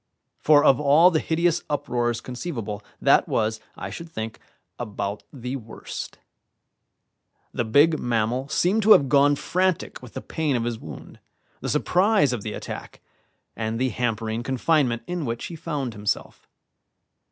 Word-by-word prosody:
For 145 -1 +5
of 135 -2 +5
all 150 +5 +6
the 160 - +2
hideous 170 +2 +1
uproars 120 -5 -1
conceivable, 120 - -5 0.2
that - - +4
was, 110 0 0 0.2
I - - -6
should 170 -1 -8
think, 110 -7 -6 0.4
about 105 -3 -4
the 125 0 -5
worst. 115 -3 -8 1.4
The 120 - -1
big 150 +8 +4
mammal 120 +3 -1
seemed 190 +8 +2
to 215 +1 +8
have 140 -2 +4
gone 145 0 +5
frantic 185 +3 -1
with 125 -2 -12
the - - -4
pain 155 -4 -1
of 120 - 0
his 115 -1 -3
wound, - - -10 0.4
the - - -4
surprise 190 - +3
of 120 - -3
the 105 - -5
attack, - - -7 0.6
and 110 0 -2
the 130 +2 +1
hampering 115 -1 -2
confinement 130 -1 +1
in 175 -2 -3
which 115 -3 -3
he 170 - -7
found 145 -7 -3
himself. 105 0 -3
130 Hz, 150 wpm, -24 LUFS, 115-160 Hz, 1.4 s, to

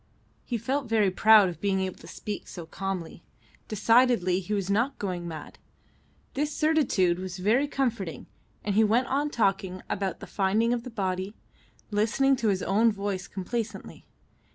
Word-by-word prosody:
He 240 - -2
felt 255 +3 -2
very 215 -4 +3
proud 210 +1 +6
of 170 -2 -6
being 195 -1 +1
able 190 -1 -4
to - - -13
speak 210 -2 -6
so 175 -3 -8
calmly. 185 -1 -5 0.5
Decidedly 225 -4 +3
he 195 +2 -8
was 200 -3 0
not 235 +8 +1
going 180 -3 -4
mad. 155 -3 -8 0.7
This 295 +2 -1
certitude 285 - +2
was 185 -1 -5
very 225 +10 +2
comforting, 230 - -2 0.4
and 205 - -1
he 220 +2 +5
went 225 +4 +3
on 285 +3 0
talking 195 -6 0
about 190 -3 -2
the - - -8
finding 215 +4 +1
of 240 - -1
the 250 - -8
body, 190 -2 -3 0.6
listening 225 +6 +2
to 230 - -1
his 190 -2 +1
own 220 +4 +3
voice 200 -2 -3
complacently. 210 +1 -5
205 Hz, 160 wpm, -27 LUFS, 185-235 Hz, 0.7 s, proud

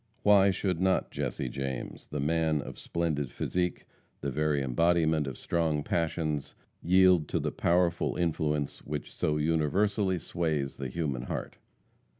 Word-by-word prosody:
Why 100 -1 +6
should 90 -2 -1
not 95 0 +2
Jesse 65 - -3
James, 65 0 -5
the 75 - -4
man 80 +1 +1
of - - -7
splendid 80 -5 -1
physique, 90 +5 -2 0.4
the 70 - -2
very 75 +1 +1
embodiment 80 +2 +2
of 65 - -5
strong 80 -3 0
passions, 80 -3 -1 0.3
yield 90 -3 +5
to - - -1
the - - -1
powerful 85 0 +1
influence 75 -4 -1
which 75 0 -5
so 75 0 0
universally 90 +6 +1
sways 80 -5 -2
the 70 - -4
human 70 -3 -2
heart? 65 - -5
80 Hz, 140 wpm, -29 LUFS, 75-85 Hz, 0.4 s, Why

